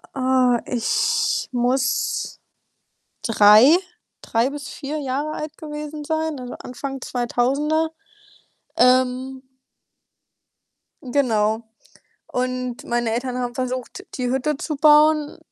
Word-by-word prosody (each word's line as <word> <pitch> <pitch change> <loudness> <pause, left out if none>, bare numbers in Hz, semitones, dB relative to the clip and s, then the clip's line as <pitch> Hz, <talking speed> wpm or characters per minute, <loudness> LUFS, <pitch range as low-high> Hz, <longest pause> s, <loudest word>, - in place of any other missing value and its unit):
Äh, 255 -2 +2 0.2
ich 465 - 0
muss 255 +1 0 0.8
3, 225 +8 +7 0.4
3 230 +3 0
bis 290 0 -7
4 300 +1 -5
Jahre 285 +2 -2
alt 305 0 -6
gewesen 300 0 -7
sein, 315 -1 -2
also 250 0 -7
Anfang 270 +1 -6
2000er, 275 +7 0 0.9
ähm 255 +1 +2 1.6
Genau. 230 -5 +1 0.6
Und 255 -1 -3
meine 235 -1 -1
Eltern 250 +2 -2
haben 245 -1 -3
versucht, 255 -2 -4
die 250 -1 -1
Hütte 265 +3 0
zu 300 +2 -4
bauen. 300 0 +4
260 Hz, 95 wpm, -22 LUFS, 245-300 Hz, 1.6 s, 3